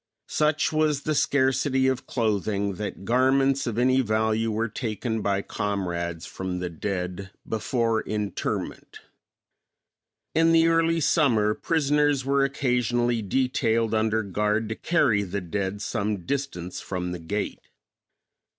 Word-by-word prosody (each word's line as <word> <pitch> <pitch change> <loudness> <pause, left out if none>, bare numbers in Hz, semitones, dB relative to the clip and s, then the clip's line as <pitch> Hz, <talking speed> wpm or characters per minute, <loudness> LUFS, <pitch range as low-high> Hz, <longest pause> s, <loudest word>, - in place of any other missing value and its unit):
Such 155 0 +1
was 155 -2 +1
the 155 - 0
scarcity 135 -1 +2
of 130 -1 -1
clothing 100 -3 0
that 100 -2 -5
garments 135 +3 +2
of 115 -2 -2
any 130 +2 +4
value 110 0 +1
were 110 +1 0
taken 110 0 -3
by 100 -1 0
comrades 85 -5 -3
from 95 -1 -4
the 90 -1 -4
dead 90 +2 -4 0.2
before 115 0 0
interment. 105 -3 -4 1.3
In 165 +1 +4
the 165 0 +5
early 165 0 +2
summer 120 -9 +3
prisoners 145 -1 +1
were 140 0 +2
occasionally 120 -3 +1
detailed 115 0 +1
under 110 0 +1
guard 105 +3 0
to 110 - -2
carry 125 -12 +2
the 100 0 -3
dead 95 +3 -3
some 100 -3 -2
distance 135 -11 -3
from 90 -2 -4
the 90 - -5
gate. 100 +6 -3
110 Hz, 125 wpm, -25 LUFS, 100-135 Hz, 1.3 s, the